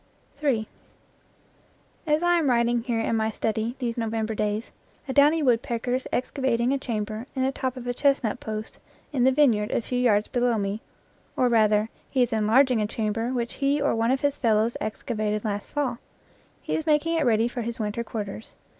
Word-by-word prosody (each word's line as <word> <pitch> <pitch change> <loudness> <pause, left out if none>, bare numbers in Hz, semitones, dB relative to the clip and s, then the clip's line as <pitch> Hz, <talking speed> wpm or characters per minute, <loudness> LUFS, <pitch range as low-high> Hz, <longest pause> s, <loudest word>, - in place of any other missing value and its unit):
in 250 -7 +1 1.4
As 300 +2 +2
I 350 0 +4
am 300 -4 +1
writing 235 -1 +2
here 230 -1 -1
in 225 - 0
my 220 0 +1
study 220 +2 -2
these 240 -2 -3
November 225 -1 -1
days, 210 +1 -2 0.4
a 265 - -2
downy 295 +3 +5
woodpecker 245 -1 +1
is 255 +1 -1
excavating 255 -1 0
a 275 - 0
chamber 220 -1 -4
in 260 - 0
the 265 - +2
top 260 -1 -3
of 250 - -7
a 245 - -1
chestnut 275 -5 +1
post 215 0 -6 0.3
in 255 -3 +2
the 265 - +6
vineyard 245 -7 +3
a - - +1
few 245 +2 -3
yards 215 -4 +3
below 245 -2 +1
me, 200 +1 -2 0.6
or 250 - +3
rather, 215 -2 +3 0.2
he 260 -2 +2
is 240 - -1
enlarging 225 +3 +3
a 210 - 0
cham 215 -1 -2
ber 230 +3 -2
which 240 -2 -2
he 280 +1 +2
or 285 0 +1
one 230 +1 +1
of 260 +1 +1
his 285 -1 0
fellows 225 -1 +2
excavated 215 -1 -2
last 205 -1 -3
fall; 260 -5 -1 0.6
he - - -2
is 315 - -3
making 310 +2 +2
it 325 - +2
ready 230 -2 +3
for 240 0 -4
his 235 +1 -4
winter 215 +2 -2
quarters. 215 -1 -6
235 Hz, 195 wpm, -25 LUFS, 220-265 Hz, 1.4 s, the